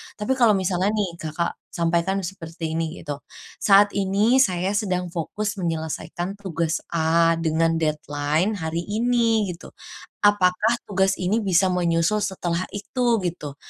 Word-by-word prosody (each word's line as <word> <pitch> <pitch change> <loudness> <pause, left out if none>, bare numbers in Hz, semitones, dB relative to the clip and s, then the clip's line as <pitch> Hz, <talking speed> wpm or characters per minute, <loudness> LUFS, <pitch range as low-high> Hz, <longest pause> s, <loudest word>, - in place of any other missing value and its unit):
Tapi 210 +5 -3
kalau 225 -4 +5
misalnya 185 0 0
nih, 185 -5 -2
Kakak 160 +2 -3
sampaikan 170 +3 0
seperti 165 -3 -6
ini 165 +1 -4
gitu. 145 -1 -5 0.4
"Saat 205 0 +5
ini 205 +6 +2
saya 185 -6 +2
sedang 185 -4 -1
fokus 210 +5 -3
menyelesaikan 165 +3 -4
tugas 170 -4 -2 0.2
A 165 +1 +3
dengan 165 0 +1
deadline 155 +4 0
hari 165 0 -3
ini 225 -2 +1
gitu. 175 - -10 0.5
Apakah 205 +2 +3
tugas 190 -1 +1
ini 190 +5 0
bisa 190 -3 +2
menyusul 175 +3 +1
setelah 185 -3 -2
itu?" 240 +3 0
Gitu. 155 -5 -4
180 Hz, 130 wpm, -23 LUFS, 165-205 Hz, 0.5 s, kalau